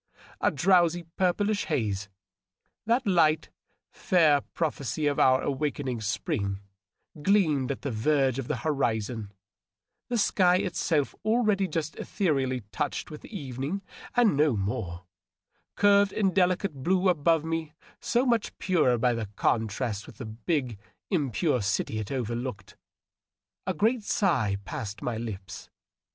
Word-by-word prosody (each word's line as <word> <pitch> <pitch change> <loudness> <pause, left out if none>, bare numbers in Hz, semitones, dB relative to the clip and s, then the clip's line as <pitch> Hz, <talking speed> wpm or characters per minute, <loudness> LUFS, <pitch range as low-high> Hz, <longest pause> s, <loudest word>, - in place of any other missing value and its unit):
A - - +3
drowsy 175 +1 +3
purplish 200 +3 +1
haze 105 -4 -1 0.4
— 90 - -45
^that 240 +3 +3
light, 160 -6 +3 0.4
fair 155 -6 +3
prophecy 150 -2 -3
of 145 -1 +1
our 130 0 +4
awakening 135 -3 -2
spring 100 -2 -2 0.3
— 150 - -19
gleamed 155 -8 +2
at 140 - -6
the 140 - -2
verge 135 +3 +1
of 130 - -4
the - - -1
hori 135 -7 +1
zon; 110 -1 -6 0.8
the 245 - 0
sky 185 -4 +4
itself, 175 -6 0
already 215 -3 +2
just 155 -2 -3
ethereally 135 -9 0
touched 150 0 -3
with 150 - -9
evening 145 - -5 0.3
and 240 -8 +4
no 145 -5 +3
more, 90 -3 -3 0.7
curved 200 -1 +4
in 195 -3 +1
delicate 185 -1 +2
blue 185 +5 +2
above 165 -2 +3
me, 160 -1 -3 0.2
so 245 +2 +1
much 235 -4 0
purer 155 -10 +2
by 120 -1 +1
contrast 110 -1 -1
with - - -13
the 125 - -6
big, 120 - -2 0.3
impure 145 - +1
city 105 +2 -1
it 105 - -5
overbrowed... 120 -5 -4 0.9
A - - 0
great 225 +7 +2
sigh 165 - +1
passed 105 +1 -6
my 120 -2 -2
lips. 95 -4 -7
145 Hz, 135 wpm, -27 LUFS, 115-185 Hz, 0.9 s, our